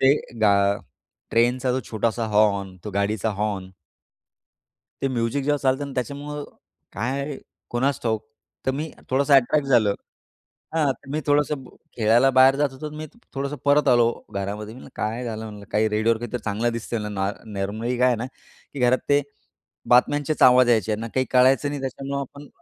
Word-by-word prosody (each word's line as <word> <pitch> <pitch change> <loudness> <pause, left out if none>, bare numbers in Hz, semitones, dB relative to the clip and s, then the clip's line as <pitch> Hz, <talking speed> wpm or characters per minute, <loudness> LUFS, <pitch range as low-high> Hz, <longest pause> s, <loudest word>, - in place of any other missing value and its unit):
ते 135 +2 +6 0.3
गा 105 -2 +5 0.8
ट्रेनचा 125 +2 +2
जो 130 - 0
छोटासा 115 +1 0
हॉर्न, 100 -3 +2
तो 105 - -4
गाडीचा 100 +2 0
हॉर्न. 100 -3 -2 1.3
ते 135 - +1
म्युझिक 130 +2 -1
जेव्हा 145 +1 +1
चालतं 135 +1 0
ना 140 - -8
त्याच्यामुळं 145 +3 -4 0.5
काय, 135 +7 -3 0.3
कुणास 130 +2 0
ठाऊक 110 -2 0 0.4
तर 130 - +2
मी 150 +3 -4 0.2
थोडंसं 140 +2 +2
अट्रॅक्ट 135 +2 +4
झालो 110 -6 +4 0.8
हां, 150 -4 +3
तर 135 +1 -17
मी 155 +2 -1
थोडंसं 145 -1 +1 0.3
खेळायला 115 +4 +4
बाहेर 130 +1 +6
जात 145 0 +1
होतो, 135 +3 -7
तर 150 - -9
मी 155 - -5 0.3
थोडंसं 140 +2 -2
परत 145 +1 +4
आलो 120 -1 +5 0.2
घरामध्ये. 105 +2 -4
मी 125 - -11
म्हणलं - - -12
काय 115 +3 -2
झालं 110 -1 -5
म्हणलं 105 -1 -9
काही 110 +1 +2
रेडिओवर 110 +2 +2
काहीतरी 120 +1 -4
चांगलं 110 +3 0
दिसतं 115 0 -3
म्हणलं 105 -1 -5
ना 95 +1 +1 0.3
नॉर्मली 110 +5 -2
काय 125 +1 +4
आहे 125 - +3
ना, 115 - -3 0.5
की 140 - -6
घरात 125 +1 +4
ते 145 0 +5 0.7
बातम्यांचेच 145 +5 +3
आवाज 125 -1 +7
यायचे 110 -2 +2
ना, 115 +2 -5
काही 130 0 +2
कळायचं 130 +3 +4
नाही 145 -1 -4
त्याच्यामुळं 135 +1 -4
आपण 140 +2 -10
125 Hz, 170 wpm, -24 LUFS, 110-140 Hz, 1.3 s, आवाज